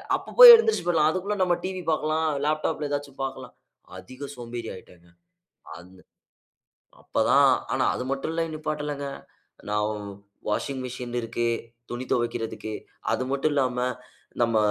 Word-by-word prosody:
அப்போ -, -, -7 dB
போய் -, -, +14 dB
எழுந்திருச்சு 445 Hz, -, +1 dB
போய்றலாம். 160 Hz, -3 st, +3 dB
அதுக்குள்ள 195 Hz, +4 st, -2 dB
நம்ம 175 Hz, -1 st, +2 dB
டிவி 185 Hz, -1 st, -4 dB
பாக்கலாம், 155 Hz, +1 st, 0 dB, 0.2 s
லேப்டாப்‌ல 155 Hz, -1 st, -1 dB
ஏதாச்சும் 145 Hz, -1 st, -5 dB
பாக்கலாம். 135 Hz, -, -6 dB, 0.4 s
அதிக 130 Hz, +10 st, -9 dB
சோம்பேறி 120 Hz, -1 st, -7 dB
ஆயிட்டேங்க. 90 Hz, -2 st, -16 dB, 0.7 s
அந்த 90 Hz, +2 st, -16 dB, 1.0 s
அப்ப -, -, -1 dB
தான் -, -, +6 dB, 0.2 s
ஆனா -, -, +1 dB
அது 125 Hz, -, -4 dB
மட்டும் 135 Hz, +3 st, -2 dB
இல்ல 165 Hz, 0 st, -1 dB
நிப்பாட்டலங்க. 150 Hz, -2 st, -4 dB, 0.6 s
நவ் 105 Hz, 0 st, 0 dB, 0.6 s
வாஷிங் 130 Hz, +5 st, -2 dB
மெசின் 125 Hz, -1 st, -6 dB
இருக்கு, 120 Hz, 0 st, -2 dB, 0.4 s
துணி 120 Hz, +1 st, -4 dB
துவைக்கிறதுக்கு. 115 Hz, -2 st, -2 dB, 0.4 s
அது -, -, 0 dB
மட்டும் 140 Hz, +2 st, 0 dB
இல்லாம 130 Hz, -3 st, 0 dB, 0.6 s
நம்ம 115 Hz, -1 st, +2 dB
135 Hz, 130 wpm, -25 LUFS, 120-155 Hz, 1.0 s, போய்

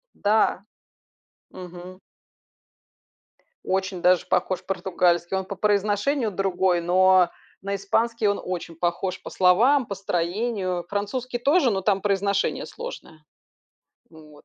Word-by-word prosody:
Да. 205 Hz, -1 st, +1 dB, 0.9 s
Мгм. 180 Hz, 0 st, -10 dB, 1.7 s
Очень 190 Hz, -1 st, -2 dB
даже 180 Hz, 0 st, +3 dB
похож 185 Hz, 0 st, 0 dB
португальский. 180 Hz, -1 st, 0 dB
Он 190 Hz, -, -1 dB
по 200 Hz, -, -6 dB
произношению 210 Hz, +5 st, +1 dB
другой, 185 Hz, -2 st, 0 dB
но 185 Hz, 0 st, +4 dB, 0.3 s
на 200 Hz, +1 st, -3 dB
испанский 225 Hz, +3 st, 0 dB
он 200 Hz, -, +1 dB
очень 175 Hz, -2 st, -5 dB
похож 175 Hz, +3 st, -2 dB
по -, -, -8 dB
словам, 230 Hz, +9 st, +4 dB
по 200 Hz, -, -4 dB
строению. 185 Hz, 0 st, -2 dB
Французский 240 Hz, +5 st, -3 dB
тоже, 280 Hz, 0 st, +3 dB
но 190 Hz, -1 st, -1 dB
там 195 Hz, 0 st, +1 dB
произношение 200 Hz, 0 st, 0 dB
сложное. 165 Hz, -, -9 dB, 0.9 s
Ну 160 Hz, -1 st, -15 dB
вот. 150 Hz, -, -18 dB
190 Hz, 115 wpm, -24 LUFS, 180-210 Hz, 1.7 s, но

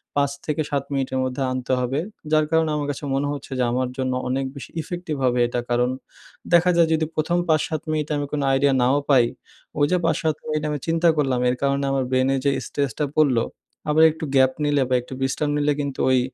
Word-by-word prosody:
৫ 140 Hz, -1 st, +2 dB
থেকে 155 Hz, 0 st, -1 dB
৭ 140 Hz, -1 st, 0 dB
মিনিটের 135 Hz, -1 st, -1 dB
মধ্যে 130 Hz, +1 st, -3 dB
আনতে 130 Hz, 0 st, -2 dB
হবে, 125 Hz, +3 st, -1 dB, 0.3 s
যার 155 Hz, 0 st, +4 dB
কারণে 160 Hz, -1 st, +3 dB
আমার 145 Hz, -1 st, -2 dB
কাছে 145 Hz, -, -8 dB
মনে 140 Hz, +1 st, 0 dB
হচ্ছে 140 Hz, -1 st, -7 dB
যে -, -, +3 dB
আমার 125 Hz, +1 st, 0 dB
জন্য 130 Hz, -1 st, -1 dB
অনেক 135 Hz, +2 st, -1 dB
বেশি 140 Hz, -, -8 dB
ইফেক্টিভ 175 Hz, 0 st, -5 dB
হবে 125 Hz, -1 st, +2 dB
এটা 120 Hz, +1 st, -2 dB
কারণ 120 Hz, +1 st, +2 dB, 0.6 s
দেখা 175 Hz, +1 st, +5 dB
যায় 170 Hz, -1 st, +5 dB
যদি 160 Hz, 0 st, +1 dB
প্রথম 170 Hz, +3 st, +1 dB
৫-৭ 155 Hz, -1 st, +1 dB
মিনিট 155 Hz, -1 st, -1 dB
আমি 145 Hz, 0 st, -1 dB
কোন 150 Hz, -, -1 dB
আইডিয়া 135 Hz, +1 st, +3 dB
নাও 130 Hz, +3 st, +3 dB
পাই, 130 Hz, -4 st, +6 dB, 0.5 s
ওই 145 Hz, -, +5 dB
যে 180 Hz, -, +4 dB
৫-৭ 160 Hz, -2 st, +1 dB
মিনিট 155 Hz, 0 st, -2 dB
আমি 150 Hz, -, -1 dB
চিন্তা 165 Hz, +1 st, +3 dB
করলাম। 135 Hz, -4 st, +1 dB
এর 125 Hz, -, 0 dB
কারণে 140 Hz, 0 st, +1 dB
আমার 135 Hz, -1 st, +1 dB
ব্রেইনে 130 Hz, +1 st, +2 dB
যে 140 Hz, -, +4 dB, 0.2 s
স্ট্রেস 140 Hz, -3 st, -1 dB
টা 150 Hz, -, +2 dB
পড়লো, 130 Hz, -7 st, +4 dB, 0.5 s
আবার 155 Hz, +2 st, +5 dB
একটু 160 Hz, +1 st, -6 dB
গ্যাপ 130 Hz, -1 st, +5 dB
নিলে 145 Hz, -1 st, +2 dB
বা 130 Hz, -, +3 dB
একটু 125 Hz, -, -10 dB
বিশ্রাম 135 Hz, +3 st, 0 dB
নিলে 150 Hz, 0 st, +2 dB
কিন্তু 140 Hz, -2 st, -5 dB
ওই 130 Hz, -, +4 dB
140 Hz, 215 wpm, -23 LUFS, 130-155 Hz, 0.6 s, পাই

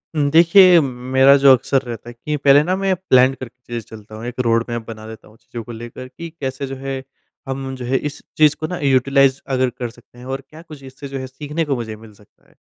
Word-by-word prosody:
हुँ, 145 Hz, -2 st, +1 dB
देखिए, 175 Hz, +2 st, +7 dB
मेरा 130 Hz, +1 st, +3 dB
जो 140 Hz, 0 st, +6 dB
अक्सर 135 Hz, +2 st, 0 dB
रहता 120 Hz, -2 st, -8 dB
है -, -, -9 dB
कि 150 Hz, +6 st, -4 dB
पहले 140 Hz, 0 st, +5 dB
ना 185 Hz, +3 st, 0 dB
मैं 195 Hz, -1 st, 0 dB
प्लान 130 Hz, -8 st, +3 dB
करके 125 Hz, -1 st, -10 dB
चीज़ें 120 Hz, -1 st, -5 dB, 0.2 s
चलता 110 Hz, 0 st, -13 dB
हूँ, 110 Hz, +2 st, -8 dB
एक 125 Hz, +1 st, -7 dB
रोडमैप 115 Hz, -1 st, 0 dB
बना 110 Hz, -1 st, -9 dB
देता 110 Hz, 0 st, -11 dB
हूँ 110 Hz, -, -20 dB
चीज़ों 115 Hz, 0 st, -9 dB
को 120 Hz, -, -10 dB
लेकर 120 Hz, +2 st, -9 dB
कि 170 Hz, +6 st, -9 dB
कैसे 135 Hz, 0 st, -4 dB
जो 135 Hz, -, -6 dB
है, 135 Hz, 0 st, -5 dB, 0.5 s
हम 135 Hz, 0 st, -4 dB
जो 125 Hz, -2 st, -7 dB
है 130 Hz, +2 st, +1 dB
इस -, -, -13 dB, 0.2 s
चीज़ 150 Hz, -1 st, +5 dB
को 155 Hz, -, -3 dB
ना 180 Hz, -, -4 dB
यूटिलाइज़ 135 Hz, 0 st, +3 dB, 0.2 s
अगर 130 Hz, 0 st, +1 dB
कर 120 Hz, -1 st, -4 dB
सकते 120 Hz, +1 st, -20 dB
हैं 125 Hz, -, -11 dB
और -, -, -7 dB
क्या 155 Hz, +1 st, -13 dB
कुछ 155 Hz, -5 st, -13 dB
इससे 135 Hz, +2 st, -10 dB
जो 135 Hz, 0 st, -6 dB
है 130 Hz, -, -6 dB
सीखने 150 Hz, +5 st, -4 dB
को 140 Hz, -2 st, -1 dB
मुझे 110 Hz, -3 st, -5 dB
मिल 110 Hz, -1 st, -15 dB
सकता 105 Hz, 0 st, -25 dB
है। -, -, -26 dB
130 Hz, 245 wpm, -19 LUFS, 120-145 Hz, 0.5 s, देखिए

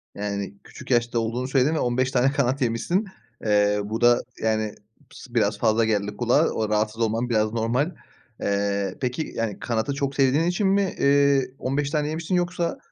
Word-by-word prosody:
Yani, 100 Hz, -1 st, -3 dB
küçük 130 Hz, -, -10 dB
yaşta 120 Hz, -1 st, +2 dB
olduğunu 115 Hz, +3 st, -2 dB
söyledin 135 Hz, +3 st, +2 dB
ve -, -, 0 dB
15 125 Hz, +1 st, 0 dB
tane 130 Hz, +1 st, +3 dB
kanat 140 Hz, -1 st, 0 dB
yemişsin. 125 Hz, -, 0 dB, 0.4 s
Eee, 105 Hz, -1 st, +3 dB
bu 110 Hz, +3 st, -4 dB
da, 120 Hz, 0 st, +5 dB, 0.2 s
yani, 110 Hz, -1 st, 0 dB, 0.4 s
sı 125 Hz, -2 st, -13 dB
biraz 105 Hz, -3 st, +2 dB
fazla 110 Hz, 0 st, +3 dB
geldi 105 Hz, -1 st, -1 dB
kulağa 125 Hz, +6 st, +3 dB
o 110 Hz, -1 st, -2 dB
rahatsız 110 Hz, +1 st, 0 dB
olman 115 Hz, +2 st, 0 dB
biraz 110 Hz, -2 st, +1 dB
normal. 120 Hz, +9 st, 0 dB, 0.5 s
Eee, 100 Hz, -1 st, -1 dB
peki, 125 Hz, +4 st, -2 dB
yani, 115 Hz, -4 st, -2 dB
kanadı 115 Hz, +4 st, -1 dB
çok 140 Hz, 0 st, -2 dB
sevdiğin 135 Hz, +3 st, +3 dB
için 175 Hz, +4 st, +1 dB
mi, 195 Hz, -1 st, +1 dB
eee, 140 Hz, -1 st, +4 dB
15 140 Hz, +2 st, -1 dB
tane 150 Hz, -1 st, 0 dB
yemişsin 165 Hz, +3 st, -2 dB
yoksa 175 Hz, -1 st, -1 dB
120 Hz, 170 wpm, -24 LUFS, 110-140 Hz, 0.5 s, da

